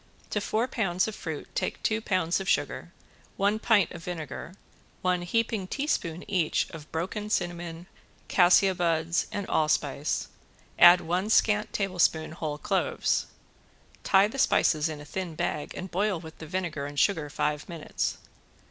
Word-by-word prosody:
To 210 - 0
four 220 +4 0
pounds 190 -7 0
of 220 - -4
fruit 160 -6 -6
take - - -3
two 220 0 +1
pounds 185 -5 +1
of 195 - -3
sugar, - - -1 0.5
one 205 +2 +2
pint 215 -6 +3
of 170 -2 -9
vinegar, 170 +1 -6 0.5
one 180 -1 +1
heaping 215 +1 -1
teaspoon 185 - -2
each 180 -6 +1
of 155 -2 -10
broken 190 +6 -3
cinnamon, 175 -3 -2 0.4
cassia 185 +1 +5
buds 170 -1 0
and 200 -1 -4
allspice, 155 -2 0 0.5
add 175 +1 +9
one 180 +5 -1
scant 210 -1 +3
tablespoon 180 -5 +1
whole 155 -2 -4
cloves. 195 +2 0 0.8
Tie 195 +1 +5
the 270 +6 -7
spices 155 -9 +3
in 155 -2 -6
a 150 - -10
thin 175 +1 -5
bag 170 -3 -3
and 185 - -6
boil 195 0 0
with 160 -1 -12
the 160 - -8
vinegar 160 -5 -3
and 145 0 -4
sugar 160 -3 +2
five 150 +1 -2
minutes. 165 -3 -3
175 Hz, 150 wpm, -28 LUFS, 160-200 Hz, 0.8 s, add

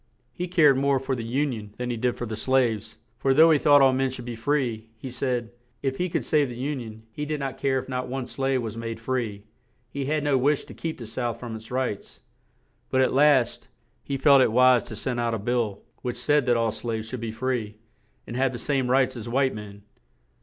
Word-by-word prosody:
He 180 0 -4
cared 155 -6 +5
more 140 0 +2
for 130 0 -2
the 120 - -4
Un 135 +4 0
ion 105 -2 -8
than 125 0 -3
he - - -2
did 120 +2 -1
for 120 - -3
the 110 -1 -4
slaves; 115 -3 0 0.2
for, 135 -1 +2
though 160 +3 +7
he 155 - +4
thought 145 -1 +6
all 135 -1 +5
men 135 0 +1
should 125 -1 -7
be 120 -1 -5
free, 115 -3 -1
he 130 +3 -7
said, 120 -2 -2 0.3
if 135 -1 -1
he 180 0 0
could - - -2
save 150 -3 +2
the 120 - -7
Un 135 +3 -3
ion, 110 -2 -9
he 150 - -5
did 150 0 -2
not 135 -1 -4
care 135 -1 +1
if 130 - -4
not 125 -1 -3
one 130 0 -3
slave 135 0 -1
was 110 -1 -5
made 115 -1 -5
free; 115 -4 -3 0.5
he 140 +1 -3
had 150 +1 0
no 145 -3 +2
wish 145 +3 +1
to - - -11
keep 160 -1 -5
the 120 - -8
South 120 +1 -3
from 120 -2 -6
its 110 0 -10
rights; 125 -5 -3 0.7
but, 130 - +1
at 130 - +3
last, 135 -3 +3 0.4
he 140 - -3
felt 140 0 +6
it 125 - +3
wise 125 +1 +5
to 110 - -7
send 120 +3 -2
out 115 -1 0
a - - -1
bill, 110 -2 -1 0.2
which 125 -1 -3
said 145 +1 +2
that 120 -1 +4
all 115 -1 +1
the - - -9
slaves 110 -2 -4
should 125 +1 -6
be 115 - -3
free, 115 -2 -2 0.5
and 115 - -7
have 130 0 +1
the - - -4
same 135 0 -1
rights 130 0 +3
as 115 -1 -6
white 135 +2 +2
men. 100 -1 -9
125 Hz, 240 wpm, -25 LUFS, 115-135 Hz, 0.7 s, though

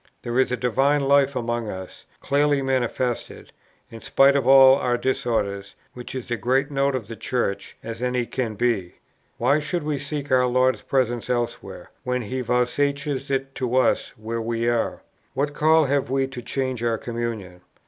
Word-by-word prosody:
There 120 +1 -1
is 130 - +2
a 125 - 0
divine 135 +4 +2
life 140 0 +3
among 120 -2 -2
us, 95 -1 -8
clearly 145 0 +2
manifested, 130 -2 -2 0.4
in 115 -1 -10
spite 140 +1 +4
of 135 -3 +1
all 135 0 +8
our 125 -3 0
disorders, 110 -6 -2 0.2
which 125 +1 -8
is 125 -2 -6
as 120 - -1
great 130 +6 +1
a - - -8
note 140 0 +1
of 115 -6 -4
the 115 - -7
Church, 110 -3 -3
as 115 +1 -6
any 125 -1 0
can 115 -3 -3
be. 105 -6 -1 0.4
Why 150 - +3
should 155 +2 -3
we 150 -2 -2
seek 145 0 -5
our 125 -1 +4
Lord's 130 -3 +2
presence 120 -3 -1
elsewhere, 120 -1 -3
when 125 0 -1
He 130 +5 -3
vouchsafes 140 +3 -1
it 135 0 -2
to 125 -2 -2
us 130 - +1
where 115 +1 -4
we 115 +1 -2
are? 120 -1 -1 0.3
What 145 +2 -1
call 155 +1 +4
have 140 -2 0
we 135 0 +1
to 130 -2 -7
change 130 0 -3
our 115 -1 +1
communion? 115 -7 -5
125 Hz, 180 wpm, -23 LUFS, 115-135 Hz, 0.4 s, all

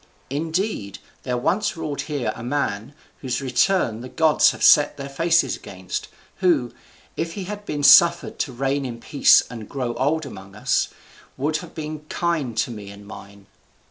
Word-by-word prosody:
Indeed, 160 - -2 0.2
there 125 -1 -2
once 200 +10 0
ruled 150 -3 -3
here 135 -7 -2
a - - -9
man, 120 -2 -2 0.2
whose 125 -3 -2
return 130 - +1
the 125 - -8
gods 160 +1 +4
have - - -5
set 145 0 +6
their 140 -1 -6
faces 165 -1 +2
against, 95 -1 -6 0.3
who, 160 -10 +1 0.4
if 165 0 -3
he 195 - -5
had 205 +2 -7
been 145 -1 -3
suffered 170 +4 +6
to 140 - -1
reign 135 +3 -1
in 120 -3 -6
peace 140 +3 +5
and 115 -4 -9
grow 125 -4 -3
old 145 +6 0
among 100 -6 -11
us, 105 - +1 0.5
would 150 +4 0
have - - -10
been 155 -1 -5
kind 155 -10 -1
to 120 - 0
me 105 -3 -8
and 100 0 -12
mine. 100 -1 -12
140 Hz, 170 wpm, -23 LUFS, 115-160 Hz, 0.5 s, set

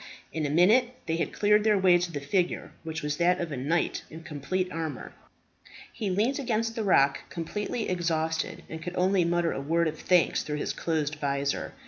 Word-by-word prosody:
In 155 -2 -1
a - - -3
minute 220 - +4
they 165 0 -1
had - - -1
cleared 210 0 +3
their 215 -1 +4
way 185 -2 +5
to 175 0 -2
the 145 - -3
figure, 175 +6 -1
which 160 -1 -5
was 150 0 -2
that 180 +1 +3
of 170 -2 -3
a - - -2
knight 150 +7 0
in 160 +1 -10
complete 165 +5 -2
armour. 160 -2 -5 0.8
He 210 -4 -3
leant 220 +9 +1
against 230 -3 -1
the 225 - -2
rock 140 -8 +3
completely 210 +6 -3
exhausted, 160 -3 -1
and 160 0 -7
could 180 +2 -6
only 185 0 +3
mutter 170 0 +1
a - - -3
word 165 +4 +1
of 155 0 -4
thanks 180 -2 +3
through 150 -1 -4
his - - -2
closed 155 -2 -1
visor. 140 0 -1
170 Hz, 195 wpm, -28 LUFS, 155-190 Hz, 0.8 s, way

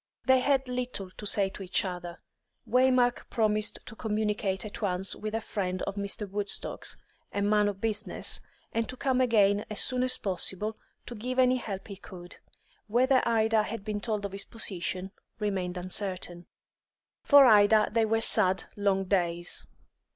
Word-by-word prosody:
They 260 0 +5
had 270 0 +1
little 250 -6 -4
to 210 - -7
say 200 -1 +2
to 195 - -11
each 190 +1 0
other, 175 -2 -6 0.5
Waymark 250 +1 +3
promised 215 -2 +1
to 220 - -10
communicate 210 -3 -1
at 210 - -8
once 190 -1 +1
with 215 +1 -4
a 225 - -1
friend 185 -4 -3
of 200 - -3
Mr. 200 +1 -4
Woodstock's, 205 +1 -2 0.3
a 200 - -1
man 210 0 +3
of 200 -2 -3
business, 215 -1 -2 0.3
and 230 0 -1
to 255 - -7
come 260 -1 +1
again 205 -4 +3
as 215 - -1
soon 250 -1 +3
as 255 0 +2
possible, 195 +3 -2 0.3
to 245 - -7
give 250 +3 -4
any 255 0 +4
help 195 -5 -6
he 200 -2 -8
could. 180 -2 -11 0.5
Whether 255 +4 +3
Ida 220 -1 +3
had 210 0 -5
been 210 -1 -3
told 210 -2 -2
of 200 - -4
his 200 +1 -5
position 190 -3 -4 0.3
remained 190 -4 -2
uncertain. 180 -1 -4 0.7
For 285 -2 +7
Ida 215 -2 +6
they 230 0 +2
were 225 +1 +1
sad, 190 -4 +3
long 200 -2 +1
days. 175 -3 0
210 Hz, 165 wpm, -29 LUFS, 195-230 Hz, 0.7 s, For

